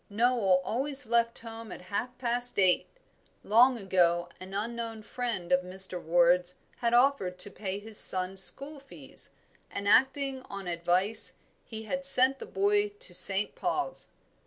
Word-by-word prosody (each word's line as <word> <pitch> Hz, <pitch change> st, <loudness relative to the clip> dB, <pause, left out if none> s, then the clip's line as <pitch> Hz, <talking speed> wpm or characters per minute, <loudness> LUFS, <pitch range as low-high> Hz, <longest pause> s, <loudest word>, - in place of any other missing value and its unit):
Noel 210 Hz, -4 st, +1 dB
always 270 Hz, +3 st, -2 dB
left 235 Hz, 0 st, 0 dB
home 225 Hz, -2 st, -2 dB
at -, -, -10 dB
half 250 Hz, +4 st, -4 dB
past 245 Hz, 0 st, 0 dB
eight 185 Hz, -2 st, +1 dB, 0.6 s
long 245 Hz, +4 st, +3 dB
ago 175 Hz, -4 st, 0 dB
an 185 Hz, +1 st, -11 dB
unknown 225 Hz, +2 st, -6 dB
friend 220 Hz, -7 st, -5 dB
of 180 Hz, 0 st, +3 dB
Mr. 185 Hz, 0 st, -2 dB
Ward's 175 Hz, +2 st, +1 dB, 0.2 s
had 235 Hz, -1 st, -2 dB
offered 245 Hz, -8 st, +1 dB
to 200 Hz, +2 st, +1 dB
pay 195 Hz, -2 st, -6 dB
his 210 Hz, +1 st, +1 dB
son's 185 Hz, +1 st, +3 dB
school 280 Hz, +8 st, -1 dB
fees, 275 Hz, 0 st, -12 dB, 0.4 s
and, 200 Hz, -, -6 dB
acting 265 Hz, +4 st, +1 dB
on 200 Hz, -2 st, -8 dB
advice, 180 Hz, +5 st, 0 dB, 0.3 s
he 220 Hz, -1 st, -9 dB
had 275 Hz, +5 st, -5 dB
sent 270 Hz, 0 st, +7 dB
the -, -, -9 dB
boy 410 Hz, +1 st, 0 dB
to 410 Hz, -, -9 dB
St. 190 Hz, +3 st, +4 dB
Paul's. -, -, -4 dB
220 Hz, 150 wpm, -27 LUFS, 185-250 Hz, 0.6 s, sent